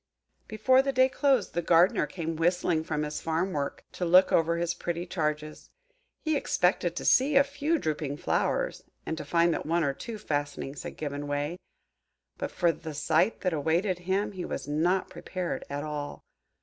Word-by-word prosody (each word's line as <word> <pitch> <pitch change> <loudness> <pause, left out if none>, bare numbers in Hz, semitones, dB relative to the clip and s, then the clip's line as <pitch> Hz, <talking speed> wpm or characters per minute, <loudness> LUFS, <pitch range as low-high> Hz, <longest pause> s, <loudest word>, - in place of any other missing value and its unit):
Before 255 +5 +4
the 275 0 -1
day 260 0 +5
closed, 265 -3 +1
the 175 - 0
Gardener 170 -1 +4
came 165 +1 -4
whistling 170 0 +1
from 150 -1 -2
his 150 0 -4
farm 165 +4 -1
work, 140 -1 -3
to - - -5
look 180 +2 +6
over 170 +1 +3
his 170 0 0
pretty 175 0 -3
charges. 155 -3 -3 0.5
He 315 -1 +1
expected 180 -9 +1
to - - -4
see 275 +3 +4
a 275 - +7
few 290 +4 -1
drooping 150 - -2
flowers, - - -1 0.2
and 160 - -2
to 155 - -6
find 170 +3 +2
that - - -4
one 170 +1 +2
or 140 -2 +1
two 225 - -7
fastenings 145 -4 -3
had - - -8
given 145 -1 -4
way. 145 +5 -2 0.8
But - - -2
for 175 -2 +2
the 160 -1 -8
sight 160 +8 +1
that 185 -2 0
awaited 170 +5 0
him 200 +2 +1
he 185 -3 -6
was - - -5
not 175 +6 +1
prepared 180 -2 -4
at 140 +1 -3
all. 150 -1 -5
170 Hz, 180 wpm, -28 LUFS, 150-190 Hz, 0.8 s, a